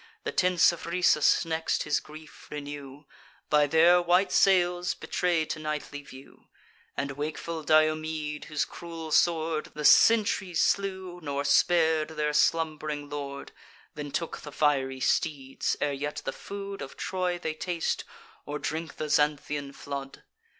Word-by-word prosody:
The - - -2
tents 180 -2 +4
of 170 - -8
Rhesus 170 -4 +3
next, 160 0 -1
his 150 - +1
grief 155 +1 -13
renew, 145 -1 -8 0.5
By 150 -1 +5
their 170 +4 +5
white 180 +3 +3
sails 180 -2 +3
betray'd 170 -3 -1
to - - -4
nightly 150 -1 -4
view; 135 -1 -15 0.5
And 140 0 -2
wakeful 155 +3 -4
Diomede, 155 -1 +1
whose 150 -1 -1
cruel 165 -2 -8
sword 160 -1 +2
The 150 0 -4
sentries 205 -5 +5
slew, 190 -2 0
nor 140 -2 -2
spar'd 160 +1 +3
their 150 0 0
slumb'ring 150 -2 0
lord, 140 -1 -6 0.4
Then 150 -1 -6
took 145 +4 -3
the 150 - -9
fiery 135 -3 +1
steeds, 135 -3 0
ere 145 -1 0
yet 145 +2 -4
the - - -2
food 200 0 -7
Of 135 - -8
Troy 180 -1 -2
they 160 -2 -3
taste, 170 +1 -2 0.4
or 145 0 -4
drink 160 +2 -4
the 155 - -4
Xanthian 145 -1 0
flood. 140 -1 -7
155 Hz, 140 wpm, -28 LUFS, 145-170 Hz, 0.5 s, By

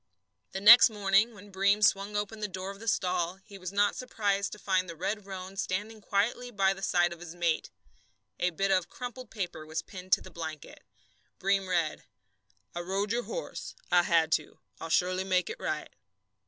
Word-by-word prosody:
The 190 - -4
next 230 +5 +10
morning, 205 +2 +2
when 205 0 -13
Breem 200 +2 +2
swung 205 0 +3
open 205 +1 -2
the 210 - -2
door 190 0 -5
of 200 - -12
the 225 - -10
stall, 180 -4 0
he 200 -2 -12
was 185 -1 -5
not 205 0 +2
surprised 200 -5 -1
to - - -8
find 185 -3 0
the 170 - -6
red 200 +4 -3
roan 190 0 -7
standing 210 +4 -3
quietly 220 +5 0
by 195 -4 +2
the 195 - -11
side 175 -2 +2
of 170 - -13
his 175 -1 -9
mate. 170 -2 0 0.7
A 180 - +2
bit 195 +3 -1
of 185 -2 +2
crumpled 250 -1 -7
paper 180 -7 -5
was 160 +1 -4
pinned 185 -1 -10
to - - +5
the - - -12
blanket. 160 -3 -7 0.5
Breem 195 0 +1
read: 170 -4 0 0.7
I 175 - -4
rode 195 +4 -2
your 240 +1 0
horse. - - -6 0.2
I 180 - +6
had 165 -2 +2
to. - - 0 0.2
I'll 165 - -6
surely 185 +3 +2
make 185 -2 +1
it - - -8
right. 155 -1 -3
195 Hz, 195 wpm, -29 LUFS, 180-205 Hz, 0.7 s, next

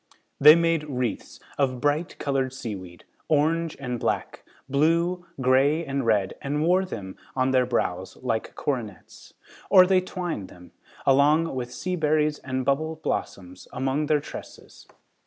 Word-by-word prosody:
They 150 +2 +9
made 165 -2 +1
wreaths 125 -4 -3 0.2
of 130 -3 +1
bright 145 +5 -1
colored 135 -2 -1
seaweed, 95 -9 -7 0.2
orange 160 +2 +1
and 125 -3 -4
black, - - -2 0.2
blue, 170 +5 +1
gray 135 +5 +3
and 140 -1 -2
red 100 -4 +2
and 150 +2 -1
wore 180 +3 +3
them 100 - -7 0.2
on 130 0 +1
their 130 -1 +3
brows 95 -6 -2
like 115 -3 -2
coronets. 120 -9 -5 0.3
Or, 185 -2 +8
they 185 0 +3
twined 175 - -4
them, 90 -1 -15 0.3
along 150 +4 +4
with 125 -2 -4
sea 180 +8 -3
berries 150 -2 +1
and 130 -1 -3
bubble 155 +4 0
blossoms, 90 - -5
among 135 +3 -1
their 150 0 +3
tresses. 145 - -11
140 Hz, 140 wpm, -25 LUFS, 125-160 Hz, 0.3 s, They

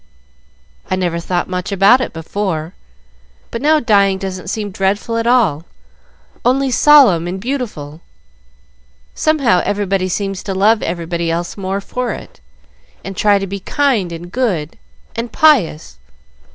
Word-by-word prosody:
"I 185 - +1
never 175 -2 -1
thought 175 +1 -2
much 180 +2 -4
about 200 +6 +5
it - - -3
before, 165 0 -4 0.8
but 230 - -4
now 310 +2 +4
dying 200 -6 +3
doesn't 190 -2 -6
seem 205 -1 -3
dreadful 195 +5 -1
at 230 0 -1
all 200 - +2 0.8
only 265 +2 +2
solemn 245 - +5
and 185 +2 -4
beautiful. 205 - -5 1.1
Somehow 275 - +2
everybody 195 -2 -1
seems 195 +1 -3
to 195 - -4
love 215 +3 +3
everybody 170 0 -3
else 170 +1 -3
more 195 0 -3
for 250 +4 -3
it, - - -11 0.7
and 195 - -6
try 205 +1 +3
to 195 - -3
be 195 +1 -5
kind 230 -5 0
and 170 +1 -8
good 185 - -2 0.4
and 230 +1 -4
pious. 170 - +2
195 Hz, 140 wpm, -16 LUFS, 175-230 Hz, 1.1 s, about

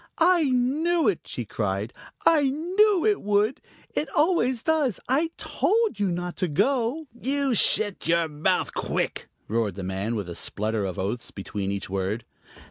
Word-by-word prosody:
"I 345 -1 +4
knew 295 +6 +2
it!" 195 -5 0
she 120 - -4
cried. 100 +1 -2 0.3
"I 300 -4 +5
knew 360 +6 +2
it 420 -2 +2
would! 210 +4 +1 0.3
It 305 - -1
always 295 -8 +2
does. 305 - +1
I 295 +6 +2
told 445 - +1
you 200 - +2
not 175 0 -3
to 185 - 0
go." 255 - +1
"You 270 +2 0
shet 205 -3 +1
your 170 0 +3
mouth 155 +5 0
quick!" - - -2 0.2
roared 110 -4 0
the 100 - -6
man, 95 +5 -2
with 100 -4 -3
a 85 - -5
splutter 105 +4 -2
of 95 -2 -4
oaths 105 +6 -3
between 100 0 -4
each 100 -1 -3
word. 100 +4 -2
205 Hz, 160 wpm, -25 LUFS, -, 0.3 s, I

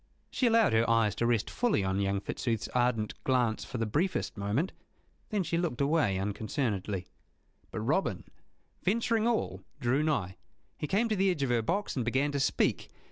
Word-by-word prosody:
She 255 - +2
allowed 225 - +4
her 115 +1 +3
eyes 115 -3 +3
to 115 - +1
rest 115 -3 +1
fully 240 - +1
on 95 +1 0
young 100 0 0
Fitzooth's 115 0 -2
ardent 120 -3 +1
glance 125 -4 +1
for 130 - -6
the 115 - 0
briefest 165 - -1
moment. 110 - -1 0.6
Then 205 -3 0
she 165 0 -1
looked 165 -9 -2
away 140 -9 +2
unconcernedly. 100 -1 -2 0.6
But - - -4
Robin, - - 0 0.6
venturing 225 +2 +1
all, 235 -2 0 0.2
drew 130 +2 +2
nigh. 135 -12 -1 0.4
He 150 - -2
came 215 +7 +2
to 215 - +1
the 195 0 +3
edge 165 -6 0
of 130 - 0
her 120 -1 +3
box, 195 - -1
and 125 - 0
began 135 +5 +1
to 140 - -1
speak. 135 - +1
125 Hz, 180 wpm, -30 LUFS, 110-175 Hz, 0.6 s, allowed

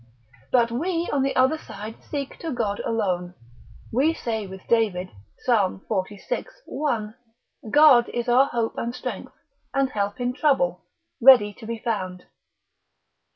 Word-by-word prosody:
But 235 -2 +3
we 335 +7 -1
on 280 - +2
the 270 +1 0
other 260 +5 +3
side 215 -2 -9
seek 280 -2 -4
to 330 - -4
God 220 -5 -2
alone. 180 -5 -2 0.6
We 295 +7 +2
say 220 -7 -3
with 190 0 -10
David, 205 -6 +1 0.4
Psal. 205 -7 +2
xlvi. 205 - -3 0.2
1. 230 -7 -2 0.5
God 290 -3 +6
is 240 0 -3
our 255 +3 +5
hope 230 -3 -1
and 235 +1 -3
strength, - - -6 0.4
and 270 -1 +1
help 205 +3 -2
in 245 0 -1
trouble, 250 - +1 0.4
ready 230 -5 +7
to 220 - -12
be 230 0 -3
found. 185 -6 -3
235 Hz, 140 wpm, -24 LUFS, 205-265 Hz, 0.6 s, ready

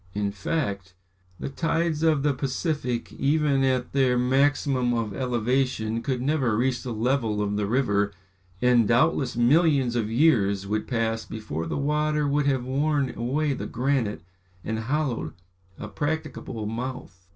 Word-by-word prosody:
In 100 -1 -1
fact, 100 - -3 0.4
the - - -4
tides 165 +2 -1
of 155 -4 +3
the 145 -1 +2
Pacific, 130 -2 -2
even 140 -1 +2
at 130 -2 0
their 130 -3 +3
maximum 130 -1 +2
of 110 -3 -2
elevation, 120 -1 0
could 125 -2 -2
never 130 -6 +1
reach 125 +1 0
the 125 - -5
level 115 -1 0
of 105 0 -1
the 105 -1 -1
river, 100 -4 +1 0.5
and, 120 -3 +4
doubtless 125 +1 +2
millions 135 -1 +3
of 110 -3 0
years 110 -7 +3
would 105 +2 -2
pass 115 -2 -1
before 85 -8 -5
the - - -2
water 150 +1 +1
would 145 0 +1
have 130 -3 +1
worn 140 +1 0
away 140 +5 0
the - - -5
granite 120 - -1 0.4
and 110 0 -2
hollowed 125 - -2 0.4
a 100 - -6
practicable 130 -2 -4
mouth. 115 -5 -6
125 Hz, 145 wpm, -25 LUFS, 110-140 Hz, 0.5 s, and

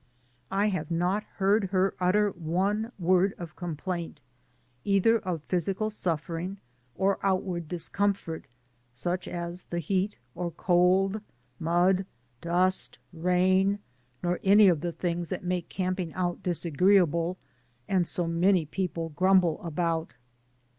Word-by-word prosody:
I 200 +2 +2
have 160 -6 -3
not 180 +5 0
heard 200 +1 +3
her 190 0 +1
utter 205 +3 +3
one 190 +7 -1
word 185 +1 +2
of 170 -3 -8
complaint, 170 -1 -4 0.6
either 205 +3 +3
of 180 -6 -4
physical 195 +5 -1
suffering 175 0 -3 0.4
or 195 +1 +1
outward 185 -3 -1
discomfort, 180 0 -2 0.5
such 175 +9 -3
as 175 +1 -5
the 170 - -3
heat 190 +5 -1 0.2
or 175 0 -3
cold, 185 +4 +2 0.4
mud, 180 +3 +2 0.3
dust, 180 +2 +1 0.2
rain, 185 +3 +2 0.5
nor 175 0 0
any 200 +1 +7
of 165 -5 +1
the 175 0 -2
things 175 0 -3
that 185 - -4
make 180 -1 -2
camping 185 -2 -2
out 175 -1 -1
disagreeable, 175 0 +2 0.5
and 185 -3 +1
so 175 - -1
many 170 +1 +3
people 165 0 -3
grumble 180 0 +3
about. 165 -4 -2
180 Hz, 120 wpm, -28 LUFS, 170-195 Hz, 0.6 s, any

